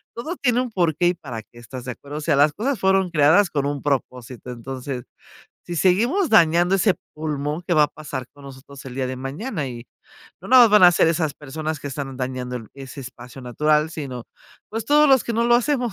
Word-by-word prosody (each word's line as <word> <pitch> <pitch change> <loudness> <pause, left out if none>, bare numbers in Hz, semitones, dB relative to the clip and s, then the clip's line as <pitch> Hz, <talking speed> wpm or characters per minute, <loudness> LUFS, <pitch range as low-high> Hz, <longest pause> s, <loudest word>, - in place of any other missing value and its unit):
todo 310 +10 -5
tiene 250 -2 +1
un 250 -2 -4
por 170 -6 +1
qué 175 0 +2
y - - +1
para 120 -9 -8
qué, 120 - -18
¿estás 125 +1 -9
de 125 - -4
acuerdo? 145 +4 -9
O - - -5
sea, 150 -1 +1
las 145 +1 +4
cosas 250 - -2
fueron 190 -2 +2
creadas 160 +6 +4
con 140 -2 -1
un 145 -1 -3
propósito. 125 -3 -3
Entonces, 125 +1 -6 0.6
si 175 - -5
seguimos 235 - +2
dañando 175 -1 +4
ese 195 0 +2 0.2
pulmón, 150 +1 -4
¿qué 175 - +2
va 150 -2 +5
a - - +2
pasar 145 -4 -7
con 145 -1 -16
nosotros 135 0 -12
el 125 - -8
día 130 -1 -2
de 130 0 -5
mañana? 145 - -4
Y, 120 -1 -8 0.6
no - - -11
nada 255 -2 +8
más 220 - +3
van 210 -3 +6
a 175 - +8
ser 165 - +3
esas 160 -3 -1
personas 155 +2 -5
que - - -7
están 135 -1 -6
dañando 125 -1 -4
el 115 -3 -9
ese 135 0 -9
espacio 125 +1 -11
natural, 150 +5 +1
sino, 130 -7 -6 0.5
pues, 225 0 -4
todos 295 0 +5
los 265 -3 +5
que 235 - -3
no 230 +1 +1
lo 240 0 +4
hacemos, 245 -3 0
150 Hz, 225 wpm, -22 LUFS, 130-190 Hz, 0.6 s, nada